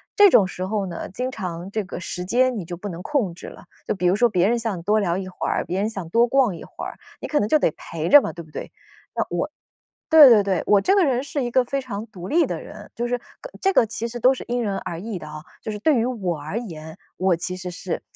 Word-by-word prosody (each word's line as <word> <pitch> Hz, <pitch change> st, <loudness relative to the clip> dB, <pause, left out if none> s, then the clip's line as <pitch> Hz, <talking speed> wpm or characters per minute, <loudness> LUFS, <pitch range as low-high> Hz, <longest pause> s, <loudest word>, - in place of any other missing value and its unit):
这 410 Hz, -1 st, +8 dB
种 200 Hz, -, +5 dB
时 185 Hz, 0 st, -5 dB
候 205 Hz, 0 st, -1 dB
呢， 170 Hz, -2 st, -6 dB
经 250 Hz, +7 st, -3 dB
常 180 Hz, -4 st, -5 dB
这 215 Hz, 0 st, -2 dB
个 180 Hz, -, -7 dB
时 180 Hz, 0 st, -5 dB
间 250 Hz, +4 st, +2 dB
你 190 Hz, -, -4 dB
就 175 Hz, 0 st, -7 dB
不 205 Hz, -, -6 dB
能 175 Hz, -1 st, -7 dB
控 245 Hz, -, 0 dB
制 -, -, -10 dB
了。 -, -, -12 dB, 0.2 s
就 -, -, 0 dB
比 180 Hz, -3 st, -3 dB
如 180 Hz, +2 st, +4 dB
说 240 Hz, +2 st, +4 dB
别 185 Hz, -1 st, +2 dB
人 240 Hz, +1 st, +2 dB
想 220 Hz, -7 st, -3 dB
多 210 Hz, +2 st, +2 dB
聊 175 Hz, -2 st, 0 dB
一 190 Hz, -1 st, -4 dB
会 185 Hz, -, -5 dB
儿， -, -, 0 dB
别 190 Hz, +2 st, -2 dB
人 215 Hz, -, 0 dB
想 195 Hz, -6 st, -6 dB
多 235 Hz, +5 st, +4 dB
逛 255 Hz, -7 st, +2 dB
一 -, -, -9 dB
会 -, -, -8 dB
儿， -, -, -6 dB, 0.2 s
你 -, -, -5 dB
可 300 Hz, -, +1 dB
能 205 Hz, -, -1 dB
就 310 Hz, -, +4 dB
得 160 Hz, -, +2 dB
陪 165 Hz, 0 st, -5 dB
着 290 Hz, +6 st, +9 dB
嘛， -, -, -3 dB
对 170 Hz, -, -9 dB
不 -, -, -19 dB
对？ -, -, -7 dB, 0.4 s
那 -, -, 0 dB
我 -, -, -1 dB, 0.6 s
对 305 Hz, -4 st, +10 dB
对 210 Hz, -4 st, +6 dB
对， 190 Hz, -3 st, 0 dB
我 205 Hz, -1 st, +4 dB
这 385 Hz, -, +3 dB
个 380 Hz, -5 st, +4 dB
人 260 Hz, -1 st, +1 dB
是 285 Hz, 0 st, -3 dB
一 240 Hz, -, -2 dB
个 255 Hz, 0 st, +4 dB
非 275 Hz, +3 st, -2 dB
常 225 Hz, -4 st, -5 dB
独 185 Hz, -4 st, -9 dB
立 335 Hz, +3 st, +3 dB
的 -, -, -4 dB
人， -, -, -11 dB
就 240 Hz, +1 st, -2 dB
是 245 Hz, 0 st, 0 dB
个 -, -, -14 dB
这 390 Hz, -, +3 dB
个 235 Hz, -, +4 dB
其 230 Hz, +1 st, -4 dB
实 240 Hz, +1 st, -6 dB
都 255 Hz, +3 st, +5 dB
是 -, -, -7 dB
因 245 Hz, 0 st, 0 dB
人 200 Hz, -3 st, -1 dB
而 170 Hz, -1 st, -6 dB
异 210 Hz, -1 st, -5 dB
的 155 Hz, -, -9 dB
啊。 155 Hz, -, -8 dB, 0.2 s
就 220 Hz, -, -4 dB
是 210 Hz, -, -5 dB
对 300 Hz, +5 st, +3 dB
于 230 Hz, 0 st, +2 dB
我 190 Hz, -10 st, -2 dB
而 155 Hz, +10 st, -4 dB
言， 160 Hz, -6 st, -9 dB, 0.2 s
我 185 Hz, 0 st, +2 dB
其 180 Hz, +2 st, -4 dB
实 180 Hz, 0 st, -6 dB
是 175 Hz, +1 st, -4 dB
210 Hz, 305 characters per minute, -23 LUFS, 180-245 Hz, 0.6 s, 对